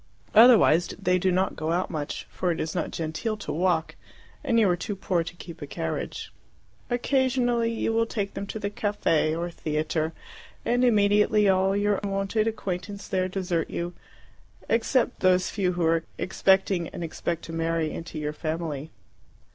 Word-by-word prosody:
Otherwise 215 -7 +7
they 180 0 +2
do 185 +1 +2
not 185 +1 +1
go 155 +1 -2
out 180 +2 0
much, 150 -3 -4
for 180 - -1
it 165 - -3
is 160 - -2
not 180 - -2
genteel 165 +8 -3
to 210 - -5
walk, 170 -1 +1 0.5
and 240 -5 +2
you 215 - +5
are 180 - +3
too 200 +3 -4
poor 180 -3 0
to 165 +1 -8
keep 170 -2 -10
a 145 - -5
carriage. 80 -11 -4 0.6
Occasionally 245 -2 +1
you 225 0 -1
will 230 0 +2
take 200 -3 -3
them 200 +1 -5
to 220 - -5
the 200 -1 -3
caffe 165 -7 +1
or 170 +1 -3
theatre, 155 0 -1 0.5
and 245 +1 +2
immediately 210 -2 +4
all 190 +1 +3
your 205 -1 +1
wonted 195 +2 0
acquaintance 200 -2 -4
there 185 -1 0
desert 180 -3 -2
you, 175 +1 -3 0.7
except 235 +2 +1
those 185 -1 +3
few 185 -4 0
who 175 -1 0
are 165 0 +2
expecting 190 -2 +2
and 175 - -7
expected 165 0 -3
to 165 - -8
marry 165 -1 0
into 165 -1 -7
your 150 0 -3
family. 155 -2 -4
185 Hz, 170 wpm, -26 LUFS, 165-210 Hz, 0.7 s, Otherwise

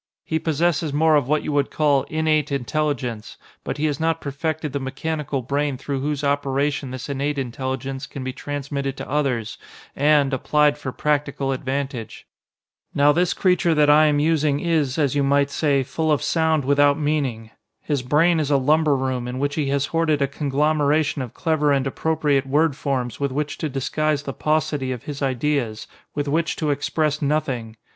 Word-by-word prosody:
He 160 - -1
possesses 160 0 0
more 155 +2 +3
of 145 -4 +2
what 150 +1 +1
you - - -3
would 145 -1 +1
call 145 -3 +2
'innate 155 -2 +1
intelligence,' 125 -4 -2 0.3
but - - -4
he 150 - 0
has 150 -1 -1
not 165 0 +1
perfected 150 +1 -3
the 140 - -1
mechanical 140 0 -3
brain 140 +2 -1
through 135 +1 -3
whose 145 +1 -2
operation 140 0 0
this 130 0 -6
innate 140 +1 -2
intelligence 130 +1 -4
can 135 - -7
be 130 0 -4
transmitted 140 -1 -4
to - - -6
others 130 -6 -1 0.4
and, 145 -1 +3
applied 150 +2 +2
for 130 - -4
practical 145 -1 -1
advantage. 135 -2 -4 0.7
"Now 145 +1 +5
this 175 +3 +1
creature 180 -3 +2
that 150 -1 +5
I 155 +1 +6
am 150 -1 +2
using 150 -1 +2
is, 155 -6 0
as 145 -5 +1
you 145 - +1
might 140 0 +2
say, 140 -3 +1
full 155 +4 -1
of 150 - +1
sound 160 -3 +1
without 145 +1 +4
meaning. 140 -8 -1 0.3
His 145 -4 -2
brain 160 +6 +3
is 150 -2 -1
a 140 - +4
lumber 150 +2 +3
room 130 -2 -2
in 125 +1 -4
which 145 +2 -1
he 150 -2 -1
has 140 0 +1
hoarded 165 -1 +1
a 140 - +2
conglomeration 150 +1 +1
of 125 -2 -7
clever 155 -3 +1
and 135 -1 +2
appropriate 145 -1 0
word 150 +1 +2
forms 130 -5 -2
with 140 -1 -1
which 150 +2 -3
to 155 - -2
disguise 145 +2 -1
the 135 - -5
paucity 150 -3 0
of 125 -3 -5
his 145 -1 -6
ideas, 130 -4 -1 0.3
with 145 0 -2
which 160 +3 0
to 150 -2 -1
express 150 +1 -1
nothing! 130 -7 -1
145 Hz, 180 wpm, -22 LUFS, 135-155 Hz, 0.7 s, I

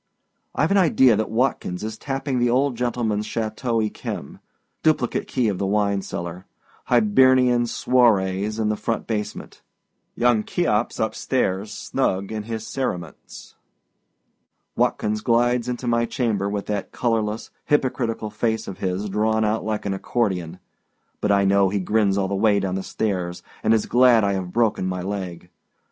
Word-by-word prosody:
Iâve - - +2
an 200 - +4
idea 130 - +5
that 110 +1 -1
Watkins 110 -6 -1
is 110 0 -4
tapping 135 +1 -3
the 120 0 +2
old 130 +2 +2
gentlemanâs 115 -3 -1
Chateau 115 +2 -2
Yquem. 110 -1 -4 0.4
Duplicate 150 -6 +1
key 125 -4 0
of 100 -4 -1
the 100 - 0
wine 100 -1 +1
cellar. 85 0 -6 0.4
Hibernian 125 +2 +4
swarries 105 -5 +2
in 110 -1 +1
the 105 - +1
front 110 +2 -3
basement. 105 -2 -5 0.5
Young 120 -3 +3
Cheops 120 -10 0
up 110 - 0
stairs, 105 -5 -1
snug 95 +2 -2
in 110 -1 -3
his 110 -1 -4
cerements. 90 - -5 1.2
Watkins 105 0 0
glides 120 +1 +2
into 125 0 -4
my 115 -1 +2
chamber, 105 -6 -1
with 100 0 -3
that 105 -2 -3
colorless, 110 -2 -1
hypocritical 120 -6 0
face 110 +1 -1
of 95 - -7
his 95 +2 -2
drawn 110 +2 +1
out 105 +1 +1
long - - -7
like 110 -1 -2
an 100 - -1
accordion; 95 -5 -2 0.6
but 105 - +1
I 100 -1 +3
know 100 0 +4
he 100 +1 -1
grins 100 +1 +1
all 95 -1 +1
the 100 - -3
way 100 +1 +3
down 95 -1 -2
stairs, 90 -4 -3 0.2
and - - +2
is 110 -1 +3
glad 120 -2 +5
I 100 0 +1
have 95 -2 -3
broken 110 -4 +1
my 90 -1 -3
leg. 90 -3 -5
110 Hz, 155 wpm, -23 LUFS, 100-120 Hz, 1.2 s, idea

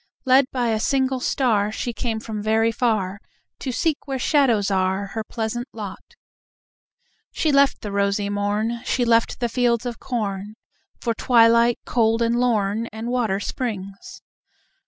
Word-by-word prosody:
Led 260 +1 +5
by 245 -3 0
a 220 -1 0
single 265 +2 +1
star, 220 -6 +1
She 240 +2 -4
came 225 -1 -3
from 220 -2 -5
very 220 +2 +2
far 215 -5 0 0.4
To 260 - -3
seek 295 +4 -1
where 270 -1 -2
shadows 240 -7 +2
are 190 +1 0
Her 220 - -3
pleasant 230 +3 -4
lot. 210 -4 -9 1.2
She 310 - 0
left 280 0 +3
the 205 - -5
rosy 200 0 0
morn, 205 +3 -1
She 245 - 0
left 230 -1 +2
the 240 - 0
fields 240 0 +1
of 240 -2 -4
corn, 210 -3 -4 0.4
For 230 - -1
twilight 235 0 +4
cold 230 -1 +2
and 230 +1 +1
lorn 225 -2 +1
And 220 +2 -6
water 230 -6 0
springs. 200 -4 -6
230 Hz, 150 wpm, -22 LUFS, 205-245 Hz, 1.2 s, Led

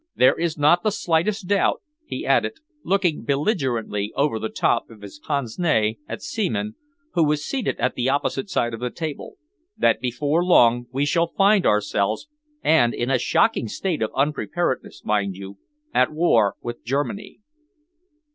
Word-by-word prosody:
There 125 - +5
is 165 -1 -2
not 150 +4 +4
the 215 - +1
slightest 190 +1 0
doubt," 200 0 +1 0.2
he - - -5
added, - - +2 0.3
looking 185 -5 +1
belligerently 130 - -1
over 140 -6 +1
the 110 - -3
top 115 - 0
of 110 -3 -15
his 100 +8 -10
pince 140 -6 -3
nez 110 -11 +2
at - - -6
Seaman, 215 0 -2 0.4
who 170 - +3
was 150 -1 0
seated 265 -3 -2
at 125 +2 +1
the 125 +1 -1
opposite 145 +8 -1
side 120 -9 0
of 115 - -5
the 125 +1 -2
table, 160 - -6 0.4
"that - - +2
before 145 +6 0
long 120 -8 +4
we 135 +3 0
shall 170 +3 +2
find 200 0 +4
ourselves 105 - 0 0.4
and 135 -7 +3
in 120 +2 -1
a 130 - +3
shocking 225 - +2
state 165 - -3
of 110 - 0
unpreparedness, 150 +1 -2
mind 100 -3 0
you 100 +1 -10 0.3
at 130 - +3
war 120 - +3
with 120 0 -6
Germany." 145 - -3
145 Hz, 160 wpm, -23 LUFS, 120-175 Hz, 0.4 s, There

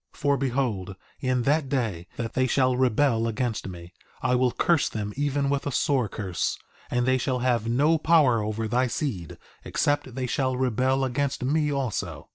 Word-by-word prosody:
2:23 - - -20
For 145 -1 +2
behold, 120 -8 -1 0.2
in 130 -2 0
that 145 +1 +1
day 110 -11 -2
that 115 -2 -4
they 130 0 +2
shall 130 -1 +2
rebel 125 -2 +2
against 115 -2 -2
me, 90 -1 -9 0.3
I 125 0 +2
will 125 0 +3
curse 170 +3 +2
them 105 -1 -4
even 145 0 0
with 140 0 -1
a - - -1
sore 130 -4 +1
curse, 95 -4 -2 0.3
and 125 0 0
they 130 0 +2
shall 130 0 0
have 120 -3 +1
no 150 +7 +3
power 150 -8 +4
over 110 +1 -2
thy 125 +3 +1
seed 115 - -4 0.3
except 145 -4 -1
they 130 -1 -2
shall 130 0 0
rebel 130 +2 +1
against 140 +1 -1
me 150 +3 +1
also. 100 - -3
130 Hz, 180 wpm, -26 LUFS, 115-140 Hz, 0.3 s, power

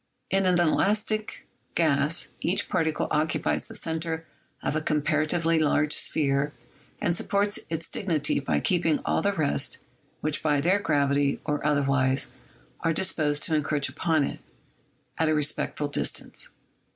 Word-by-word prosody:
In 195 0 +2
an 180 -1 +3
elastic 215 +5 0 0.3
gas 155 0 +2
each 180 - 0
particle 160 -4 0
occupies 155 +1 0
the - - -11
center 160 0 -2 0.4
of - - -1
a 155 - 0
comparatively 155 +2 +1
large 150 -1 +2
sphere 140 -1 +1 0.5
and 170 - 0
supports 205 +3 0
its 165 0 -4
dignity 165 -9 0
by 140 - 0
keeping 170 -4 +1
all - - +1
the 200 - +2
rest, 155 -7 0 0.4
which 155 -1 0
by 150 -2 +2
their 180 +7 +3
gravity, 140 -4 +1
or 150 0 -1
otherwise, 140 -3 +1 0.5
are 165 -1 +1
disposed 155 -4 0
to 160 - -1
encroach 145 -2 0
upon 155 +2 +1
it, - - -4 0.8
at 160 -1 +2
a 155 - +2
respectful 150 0 0
distance. 145 - -2
155 Hz, 140 wpm, -26 LUFS, 145-170 Hz, 0.8 s, an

